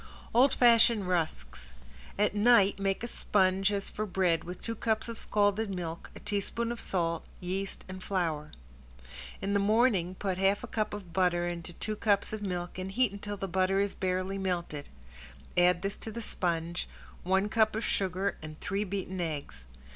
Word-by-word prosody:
~OLD 255 Hz, +3 st, +5 dB
FASHION 230 Hz, -3 st, +6 dB
RUSKS~ 65 Hz, -, -2 dB, 0.4 s
At 205 Hz, 0 st, +2 dB
night 205 Hz, -2 st, +5 dB
make 195 Hz, +2 st, 0 dB
a -, -, -1 dB
sponge 195 Hz, -3 st, +2 dB
as 200 Hz, -1 st, -2 dB
for 215 Hz, 0 st, -3 dB
bread 180 Hz, -3 st, +1 dB
with 180 Hz, +1 st, -7 dB
two 230 Hz, -, -3 dB
cups 220 Hz, 0 st, 0 dB
of 230 Hz, -, -5 dB
scalded 205 Hz, +1 st, +1 dB
milk, 170 Hz, -3 st, -5 dB
a -, -, -8 dB
teaspoon 230 Hz, +3 st, -2 dB
of 240 Hz, -, -4 dB
salt, 170 Hz, -3 st, -1 dB, 0.2 s
yeast 190 Hz, +2 st, -3 dB
and 185 Hz, 0 st, -7 dB
flour. 160 Hz, -6 st, -1 dB, 0.9 s
In 200 Hz, +1 st, 0 dB
the 200 Hz, -, +3 dB
morning 200 Hz, -4 st, +3 dB
put 190 Hz, -1 st, -2 dB
half 195 Hz, +3 st, +2 dB
a -, -, -5 dB
cup 215 Hz, -2 st, -1 dB
of 185 Hz, -5 st, -9 dB
butter 175 Hz, -1 st, +2 dB
into 175 Hz, 0 st, -5 dB
two 215 Hz, +5 st, -3 dB
cups 205 Hz, -1 st, +1 dB
of 215 Hz, -, -4 dB
milk 180 Hz, -2 st, -3 dB
and 190 Hz, +1 st, -4 dB
heat 250 Hz, -1 st, +3 dB
until 205 Hz, 0 st, -5 dB
the 195 Hz, -, -3 dB
butter 190 Hz, +1 st, +2 dB
is 200 Hz, 0 st, +1 dB
barely 185 Hz, +1 st, -1 dB
melted, 175 Hz, -6 st, -3 dB, 0.7 s
add 180 Hz, 0 st, +4 dB
this 195 Hz, +1 st, -2 dB
to 220 Hz, -, -4 dB
the 230 Hz, +1 st, -5 dB
sponge, 170 Hz, -3 st, -2 dB, 0.3 s
one 190 Hz, +3 st, +2 dB
cup 215 Hz, 0 st, +2 dB
of 220 Hz, -, -2 dB
sugar 190 Hz, +1 st, 0 dB
and 155 Hz, 0 st, -9 dB
three 200 Hz, +1 st, -1 dB
beaten 190 Hz, -2 st, -3 dB
eggs. 145 Hz, -, -5 dB
195 Hz, 175 wpm, -30 LUFS, 175-210 Hz, 0.9 s, FASHION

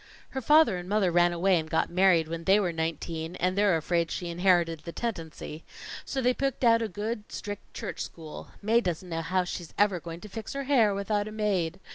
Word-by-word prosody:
"Her 265 Hz, -, -3 dB
father 295 Hz, -5 st, +5 dB
and 180 Hz, +1 st, -7 dB
mother 205 Hz, -3 st, +2 dB
ran 175 Hz, 0 st, +4 dB
away 175 Hz, +1 st, +3 dB
and 160 Hz, 0 st, -6 dB
got 160 Hz, -, 0 dB
married 175 Hz, -3 st, +4 dB
when 165 Hz, +1 st, -5 dB
they 195 Hz, +2 st, +5 dB
were 185 Hz, -4 st, 0 dB
nineteen, 160 Hz, +1 st, -3 dB
and 185 Hz, +1 st, 0 dB
they're 200 Hz, -4 st, +3 dB
afraid 170 Hz, +1 st, 0 dB
she 175 Hz, -, -4 dB
inherited 170 Hz, -2 st, +2 dB
the 170 Hz, +3 st, -8 dB
tendency. 165 Hz, -7 st, -5 dB, 0.4 s
So 265 Hz, -2 st, -2 dB
they 250 Hz, +1 st, +4 dB
picked 270 Hz, 0 st, -2 dB
out 230 Hz, -1 st, +5 dB
a 225 Hz, -, 0 dB
good, 210 Hz, +2 st, -5 dB
strict, 205 Hz, -1 st, -7 dB
church -, -, -5 dB
school. 160 Hz, -2 st, -7 dB, 0.2 s
Mae 225 Hz, +3 st, +4 dB
doesn't 180 Hz, -2 st, -3 dB
know 165 Hz, -1 st, -2 dB
how 185 Hz, +3 st, 0 dB
she's 175 Hz, -1 st, -7 dB
ever 200 Hz, -3 st, +3 dB
going 165 Hz, 0 st, -8 dB
to -, -, -9 dB
fix 220 Hz, +2 st, -7 dB
her 275 Hz, 0 st, -3 dB
hair 240 Hz, -7 st, +3 dB
without 205 Hz, +1 st, -1 dB
a -, -, -6 dB
maid. 195 Hz, -5 st, -1 dB
185 Hz, 215 wpm, -28 LUFS, 170-210 Hz, 0.4 s, father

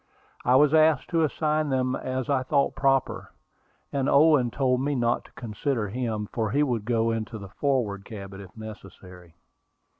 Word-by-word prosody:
I 125 Hz, -, +3 dB
was 145 Hz, +2 st, +5 dB
asked 155 Hz, +1 st, +3 dB
to 165 Hz, -1 st, +2 dB
assign 155 Hz, 0 st, 0 dB
them 130 Hz, -1 st, 0 dB
as 130 Hz, 0 st, -3 dB
I 140 Hz, -3 st, +1 dB
thought 140 Hz, +2 st, +1 dB
proper, 135 Hz, -1 st, 0 dB, 0.6 s
and 140 Hz, -1 st, 0 dB
Owen 145 Hz, -4 st, +5 dB
told 130 Hz, 0 st, 0 dB
me 145 Hz, +1 st, 0 dB
not 120 Hz, -1 st, 0 dB
to -, -, -18 dB
consider 115 Hz, 0 st, -3 dB
him, 110 Hz, -2 st, -3 dB
for 110 Hz, -3 st, -1 dB
he 140 Hz, +6 st, +2 dB
would 120 Hz, -7 st, -1 dB
go 115 Hz, -1 st, +1 dB
into 115 Hz, 0 st, -4 dB
the 100 Hz, -2 st, -9 dB
forward 110 Hz, -5 st, -1 dB
cabin 100 Hz, -3 st, -9 dB
if 95 Hz, +2 st, -14 dB
necessary. 95 Hz, -5 st, -11 dB
125 Hz, 170 wpm, -26 LUFS, 110-140 Hz, 0.6 s, was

